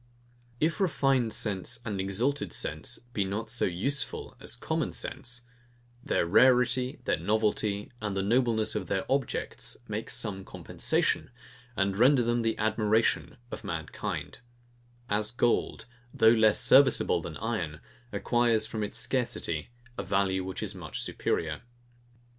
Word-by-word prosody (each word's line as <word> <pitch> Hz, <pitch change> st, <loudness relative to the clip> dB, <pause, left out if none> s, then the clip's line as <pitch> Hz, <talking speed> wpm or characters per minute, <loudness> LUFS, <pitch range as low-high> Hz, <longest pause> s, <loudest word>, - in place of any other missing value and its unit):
If 165 Hz, +6 st, 0 dB
refined 135 Hz, -9 st, +2 dB
sense 105 Hz, +2 st, +1 dB
and 100 Hz, -4 st, -2 dB
exalted 115 Hz, +9 st, -1 dB
sense -, -, -1 dB, 0.2 s
be 100 Hz, -, +1 dB
not 105 Hz, +4 st, -4 dB
so 120 Hz, -, +2 dB
USEFUL 130 Hz, +11 st, -2 dB
as -, -, -4 dB
common -, -, -2 dB
sense, 120 Hz, -1 st, -2 dB, 0.6 s
their -, -, +1 dB
rarity, 125 Hz, +5 st, +4 dB
their -, -, +1 dB
novelty, 105 Hz, -1 st, 0 dB
and 105 Hz, -2 st, -3 dB
the 95 Hz, -, 0 dB
nobleness 115 Hz, 0 st, +1 dB
of 105 Hz, -5 st, -3 dB
their 95 Hz, +1 st, -1 dB
objects 135 Hz, -3 st, -1 dB
make -, -, -4 dB
some 95 Hz, -2 st, -1 dB
compensation, -, -, -1 dB, 0.5 s
and 95 Hz, 0 st, +1 dB
render 125 Hz, +4 st, +5 dB
them 120 Hz, +1 st, +1 dB
the 115 Hz, -1 st, 0 dB
admiration 110 Hz, +1 st, +1 dB
of -, -, -6 dB
mankind: 80 Hz, -2 st, -5 dB, 0.7 s
As 105 Hz, 0 st, 0 dB
gold, 120 Hz, -1 st, 0 dB, 0.3 s
though 110 Hz, -, +5 dB
less 110 Hz, -2 st, +4 dB
serviceable 135 Hz, +1 st, +5 dB
than -, -, -7 dB
iron, 95 Hz, -9 st, -3 dB, 0.3 s
acquires 120 Hz, -2 st, +2 dB
from 110 Hz, -1 st, -4 dB
its 105 Hz, -, -3 dB
scarcity 115 Hz, -, -1 dB, 0.3 s
a -, -, -2 dB
value 95 Hz, -1 st, 0 dB
which 95 Hz, +3 st, -5 dB
is 105 Hz, -2 st, -1 dB
much 85 Hz, -7 st, -6 dB
superior. 80 Hz, -2 st, -2 dB
110 Hz, 135 wpm, -29 LUFS, 95-120 Hz, 0.7 s, render